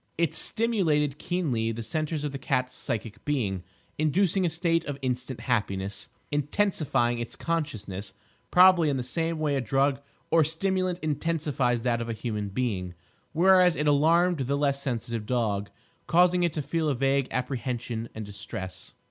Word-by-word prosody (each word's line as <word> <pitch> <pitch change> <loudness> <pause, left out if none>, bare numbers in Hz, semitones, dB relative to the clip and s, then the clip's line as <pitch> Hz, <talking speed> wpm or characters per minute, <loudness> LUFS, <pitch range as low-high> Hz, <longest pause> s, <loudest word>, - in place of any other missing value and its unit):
It 170 -2 +1
stimulated 160 -11 +1
keenly 140 -11 -1
the 115 +1 -5
centres 155 +5 -2
of 145 - -2
the 135 - -5
cat's 130 -1 -1
psychic 110 -1 -4
being, 110 -11 -1 0.4
inducing 180 +4 +2
a - - +1
state 165 0 +1
of 145 -1 -4
instant 125 -1 -2
happiness 100 -5 -2 0.2
(intensifying 145 -5 +1
its 120 - -5
consciousness 110 - -3 0.4
probably 180 -3 +6
in 140 - 0
the 125 - -2
same 165 +6 -2
way 150 -2 0
a 135 - +1
drug 135 +2 +1 0.3
or 165 -1 +6
stimulant 185 +3 0
intensifies 150 -6 0
that 120 -1 0
of 115 - -4
a - - -1
human 105 -3 -3
being); 95 -5 -2 0.4
whereas 180 +1 +5
it 150 - -1
alarmed 165 +4 +4
the 135 +2 0
less 140 -1 +1
sensitive 115 -4 -3
dog, 105 -5 0 0.4
causing 180 +1 +4
it 170 -2 +1
to 150 - -2
feel 155 +2 0
a 140 - +1
vague 135 +1 +1
apprehension 120 -2 -3
and 110 -1 -5
distress. 100 -1 -7
140 Hz, 155 wpm, -27 LUFS, 115-165 Hz, 0.4 s, probably